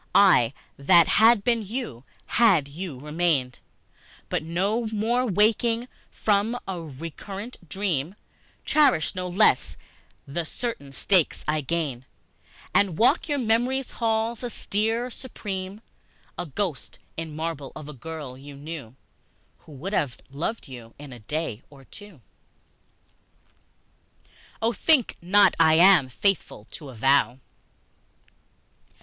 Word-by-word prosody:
I, 145 Hz, -, +6 dB, 0.2 s
that 155 Hz, +4 st, +5 dB
had 225 Hz, -1 st, +5 dB
been 235 Hz, 0 st, +2 dB
to 215 Hz, -, -7 dB
you, 195 Hz, -, -5 dB, 0.2 s
had 190 Hz, -12 st, +4 dB
you 150 Hz, -2 st, -7 dB
remained, 150 Hz, -3 st, -1 dB, 0.7 s
But -, -, 0 dB
one 195 Hz, +8 st, -1 dB
more 235 Hz, +4 st, +1 dB
waking 225 Hz, +4 st, +2 dB, 0.2 s
from 215 Hz, +3 st, +1 dB
a 185 Hz, -3 st, -4 dB
recurrent 165 Hz, -, -8 dB
dream, 180 Hz, -2 st, -2 dB, 0.5 s
Cherish 275 Hz, -, +3 dB
no 185 Hz, -1 st, -4 dB
less 175 Hz, -, +3 dB, 0.5 s
the 165 Hz, +5 st, -3 dB
certain 160 Hz, -, -5 dB
stakes 180 Hz, +4 st, +1 dB
I 150 Hz, 0 st, +1 dB
gained, 140 Hz, -4 st, -3 dB, 0.7 s
And 195 Hz, -5 st, +2 dB
walk 290 Hz, +8 st, +3 dB
your 290 Hz, -, +1 dB
memory's 250 Hz, +2 st, 0 dB
halls, 225 Hz, 0 st, -1 dB
austere, 230 Hz, +1 st, -1 dB
supreme, 200 Hz, -5 st, -6 dB, 0.5 s
A 175 Hz, -, -5 dB
ghost 165 Hz, -1 st, -4 dB, 0.2 s
in 160 Hz, -2 st, -6 dB
marble 155 Hz, -4 st, -4 dB
of 145 Hz, -, -8 dB
a 150 Hz, -, -8 dB
girl 150 Hz, -1 st, -7 dB
you 140 Hz, +2 st, -11 dB
knew 140 Hz, -4 st, -8 dB, 0.6 s
Who -, -, -17 dB
would 170 Hz, +9 st, -6 dB
have 140 Hz, -, 0 dB
loved 170 Hz, +9 st, -4 dB
you 120 Hz, -4 st, -11 dB
in 145 Hz, -2 st, -10 dB
a 120 Hz, -, -11 dB
day 125 Hz, 0 st, -4 dB
or 140 Hz, -2 st, -16 dB
two. 205 Hz, -7 st, -14 dB, 2.0 s
III. -, -, -30 dB, 0.3 s
Oh, 230 Hz, +1 st, +2 dB
think 295 Hz, -5 st, +2 dB
not 195 Hz, +2 st, +5 dB
I 160 Hz, -1 st, +6 dB
am 170 Hz, -5 st, +6 dB
faithful 160 Hz, -, -1 dB
to 145 Hz, -4 st, -8 dB
a 130 Hz, -, -10 dB
vow! 135 Hz, +2 st, +3 dB
175 Hz, 125 wpm, -25 LUFS, 145-220 Hz, 2.0 s, I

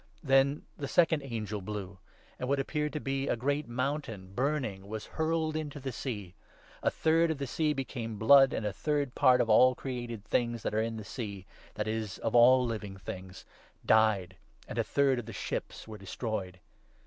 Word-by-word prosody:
* -, -, -32 dB
Then 135 Hz, +1 st, +3 dB, 0.2 s
the 140 Hz, -, -3 dB
second 160 Hz, 0 st, +3 dB
angel 110 Hz, -6 st, -4 dB
blew; 100 Hz, -1 st, -6 dB, 0.4 s
and 125 Hz, -, -3 dB
what 140 Hz, 0 st, +2 dB
appeared 150 Hz, +2 st, -1 dB
to 150 Hz, -, -2 dB
be 135 Hz, -1 st, -2 dB
a -, -, +2 dB
8 -, -, -3 dB
great 145 Hz, +4 st, -1 dB
mountain, 120 Hz, -6 st, -3 dB
burning, 120 Hz, -6 st, -1 dB
was 110 Hz, 0 st, -5 dB
hurled 160 Hz, -1 st, -1 dB
into 150 Hz, -2 st, -4 dB
the 135 Hz, -1 st, -4 dB
sea. 105 Hz, -7 st, -5 dB, 0.5 s
A -, -, +3 dB
third 165 Hz, +1 st, +2 dB
of 160 Hz, -, -1 dB
the 140 Hz, -, -3 dB
sea 155 Hz, +4 st, 0 dB
became 120 Hz, -5 st, -4 dB
blood, 135 Hz, +5 st, +7 dB
and 110 Hz, -, -2 dB
a 105 Hz, -, -1 dB
third 145 Hz, +1 st, -1 dB
part 125 Hz, -1 st, +5 dB
of -, -, 0 dB
all 125 Hz, +4 st, +6 dB
created 120 Hz, -5 st, -5 dB
things 120 Hz, 0 st, -1 dB
9 -, -, 0 dB
that -, -, -4 dB
are 110 Hz, -, +3 dB
in 115 Hz, 0 st, -2 dB
the 110 Hz, -, -6 dB
sea 100 Hz, -4 st, -6 dB, 0.2 s
— -, -, -23 dB
that 105 Hz, -, -2 dB
is, 110 Hz, -2 st, -3 dB
of 115 Hz, -, -2 dB
all 125 Hz, +2 st, +7 dB
living 105 Hz, -4 st, -4 dB
things 95 Hz, -1 st, -8 dB, 0.2 s
— -, -, -30 dB
died, 95 Hz, -4 st, 0 dB, 0.3 s
and -, -, -4 dB
a -, -, +3 dB
third 135 Hz, -3 st, +2 dB
of 120 Hz, -, -7 dB
the 115 Hz, -, -7 dB
ships 100 Hz, -, -5 dB
was 110 Hz, -1 st, -8 dB
destroyed. 100 Hz, -2 st, -4 dB
120 Hz, 205 wpm, -30 LUFS, 105-140 Hz, 0.5 s, blood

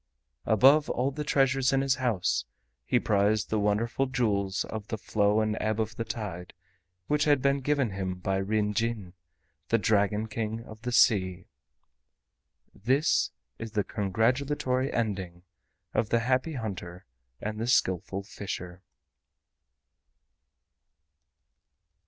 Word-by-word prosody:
Above 135 Hz, +7 st, +5 dB
all 130 Hz, +3 st, 0 dB
the 150 Hz, +2 st, -4 dB
treasures 135 Hz, -2 st, +2 dB
in 135 Hz, 0 st, +2 dB
his 135 Hz, -1 st, +2 dB
house 120 Hz, -8 st, 0 dB, 0.4 s
he -, -, +3 dB
prized 105 Hz, +1 st, +1 dB
the 110 Hz, -, +1 dB
wonderful 110 Hz, +6 st, 0 dB
Jewels 105 Hz, -7 st, 0 dB
of 110 Hz, -1 st, -6 dB
the 110 Hz, -, -3 dB
Flow 105 Hz, 0 st, +1 dB
and 110 Hz, 0 st, 0 dB
Ebb 110 Hz, +1 st, -1 dB
of 110 Hz, 0 st, -2 dB
the 115 Hz, -, -2 dB
Tide 105 Hz, -7 st, -6 dB, 0.5 s
which 150 Hz, +5 st, +1 dB
had 145 Hz, -2 st, +4 dB
been 140 Hz, +1 st, +2 dB
given 140 Hz, -4 st, 0 dB
him 95 Hz, -1 st, -3 dB
by 95 Hz, +1 st, -2 dB
Ryn 105 Hz, +2 st, 0 dB
Jin, 110 Hz, -4 st, -2 dB, 0.6 s
the 115 Hz, -, +4 dB
Dragon 105 Hz, 0 st, +1 dB
King 110 Hz, +1 st, -4 dB
of 110 Hz, -1 st, -12 dB
the 125 Hz, +1 st, -3 dB
Sea. 95 Hz, -7 st, +3 dB, 1.3 s
This 130 Hz, +8 st, +2 dB, 0.3 s
is 115 Hz, -1 st, -7 dB
the 105 Hz, -, +1 dB
congratulatory 125 Hz, +7 st, 0 dB
ending 95 Hz, -6 st, -3 dB, 0.5 s
of 110 Hz, 0 st, 0 dB
the 115 Hz, -, +2 dB
Happy 130 Hz, +6 st, 0 dB
Hunter 95 Hz, -8 st, -6 dB, 0.3 s
and 110 Hz, 0 st, -4 dB
the 115 Hz, -, -2 dB
Skillful 95 Hz, -4 st, +1 dB
Fisher. 95 Hz, -3 st, -7 dB
110 Hz, 130 wpm, -28 LUFS, 100-125 Hz, 1.3 s, Above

